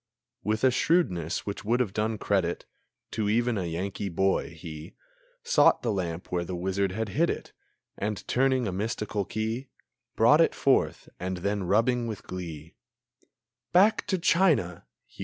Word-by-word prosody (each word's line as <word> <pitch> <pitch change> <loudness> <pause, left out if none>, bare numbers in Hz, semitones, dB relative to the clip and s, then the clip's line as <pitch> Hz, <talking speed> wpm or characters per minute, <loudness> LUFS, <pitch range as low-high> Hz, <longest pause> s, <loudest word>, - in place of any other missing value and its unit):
With 110 +3 -1
a 130 - +6
shrewdness 95 - +1
which 100 - -5
would 115 +4 +1
have 110 -7 0
done 110 +1 -1
credit 95 -4 0 0.5
To 105 -2 -1
even 120 +2 +2
a 95 -4 -2
Yankee 95 +4 -3
boy, 95 +2 +1
he 80 +1 -9 0.5
Sought 485 +1 +4
the 120 - +1
lamp 90 -3 -4
where 90 -1 0
the 90 +1 -5
wizard 95 +2 -1
had 110 +2 -3
hid 165 - +1
it, - - -5 0.5
And, 105 0 -3
turning 130 -2 +2
a - - -1
mystical 105 0 -2
key, 110 +6 -3 0.5
Brought - - +6
it - - +3
forth, - - +1
and 90 0 -3
then, 100 -1 0
rubbing 115 +5 +2
with 110 -1 -6
glee, 85 -3 -7 1.0
"Back 200 +5 +4
to 190 - +1
China!" 165 - +2
105 Hz, 155 wpm, -27 LUFS, 90-120 Hz, 1.0 s, a